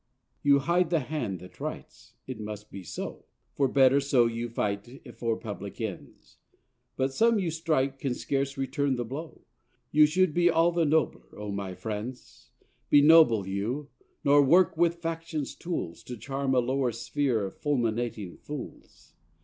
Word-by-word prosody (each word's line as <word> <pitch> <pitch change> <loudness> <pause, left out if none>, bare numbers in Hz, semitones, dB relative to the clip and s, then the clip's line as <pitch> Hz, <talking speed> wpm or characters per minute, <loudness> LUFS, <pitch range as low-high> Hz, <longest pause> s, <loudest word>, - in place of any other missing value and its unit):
You 140 -1 +5
hide 170 +4 +1
the 165 -3 +2
hand 125 - -3
that 90 - -13
writes: - - -7
it 130 -4 -7
must 105 0 -7
be 100 - -7
so, 85 - -7 0.3
For 140 - +2
better 135 +1 +5
so 135 -3 +3
you 115 +1 -2
fight 100 -1 -2 0.3
for 115 -2 -1
public 100 -3 -7
ends; 110 -5 -7 0.6
But 135 0 -1
some 230 +7 +3
you 180 -5 -1
strike 150 -4 0
can 130 -3 -2
scarce 140 +1 -2
return 135 +1 0
the 120 -1 -3
blow; 150 +7 -7 0.5
You 150 0 +6
should 180 +1 +2
be 175 +1 +4
all 165 +1 +3
the 170 -1 +1
nobler, 155 +1 0
O 105 0 -5
my 100 -2 -4
friends. 110 +5 -7 0.4
Be 145 -1 +6
noble, 145 - +6
you! 115 +10 -3 0.3
nor 145 +1 +6
work 175 +5 +4
with 170 +1 +2
faction's 165 -3 -4
tools 130 - -5
To 125 - -7
charm 135 +3 -2
a - - +5
lower 130 0 0
sphere 115 -1 -1
of 95 - -9
fulminating 115 -8 -1
fools. 145 -2 -10
135 Hz, 160 wpm, -28 LUFS, 115-155 Hz, 0.6 s, You